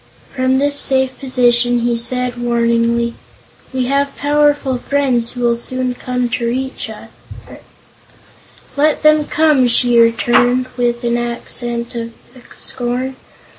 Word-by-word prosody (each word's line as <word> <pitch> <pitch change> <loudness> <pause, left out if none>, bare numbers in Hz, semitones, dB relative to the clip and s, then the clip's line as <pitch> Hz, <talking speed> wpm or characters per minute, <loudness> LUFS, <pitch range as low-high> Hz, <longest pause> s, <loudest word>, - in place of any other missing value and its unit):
From 260 0 +1
this 285 +1 0
safe 265 -1 +1
position 245 -2 +2
he 240 0 0
said 245 +1 -2
warningly: 235 0 +1 0.6
"We 260 -1 -1
have 280 +2 0
powerful 290 -3 +1
friends 255 -4 0
who 245 - -6
will 235 -1 +2
soon 255 +1 -3
come 250 0 -2
to 235 0 -2
rescue 260 +2 -4
us." - - -13 1.7
"Let 300 +2 +1
them 305 -1 +4
come," 300 -5 +3
she 240 0 +3
returned, 240 +2 +3
with 240 -1 -1
an 240 0 0
accent 240 0 -2
of 230 -1 -5 0.4
scorn. 250 +2 -3
245 Hz, 125 wpm, -16 LUFS, 235-265 Hz, 1.7 s, them